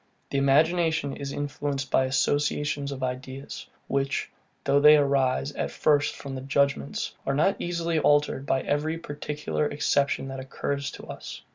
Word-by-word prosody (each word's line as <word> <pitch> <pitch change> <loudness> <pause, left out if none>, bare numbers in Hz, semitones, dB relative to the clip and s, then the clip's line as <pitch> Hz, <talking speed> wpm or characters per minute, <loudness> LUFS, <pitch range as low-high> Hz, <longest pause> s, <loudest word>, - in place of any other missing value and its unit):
The 140 - +1
imagination 155 +1 +2
is 140 -1 -5
influenced 140 -1 -3
by 130 - +4
associations 145 +1 0
of 130 -1 -5
ideas; 130 +2 -5 0.2
which, 140 +1 -1 0.3
though 140 - +3
they 150 +1 +8
arise 140 -1 +2
at - - -3
first 150 -1 +2
from 140 -1 -7
the 130 - -5
judgement, 135 - 0
are 135 - -1
not 195 +7 +2
easily 170 -2 0
altered 145 -2 +2
by 135 - +2
every 155 +3 0
particular 150 -1 -3
exception 145 -1 +1
that 135 0 -5
occurs 140 +1 -3
to - - -10
us. - - -8
140 Hz, 150 wpm, -26 LUFS, 135-150 Hz, 0.3 s, they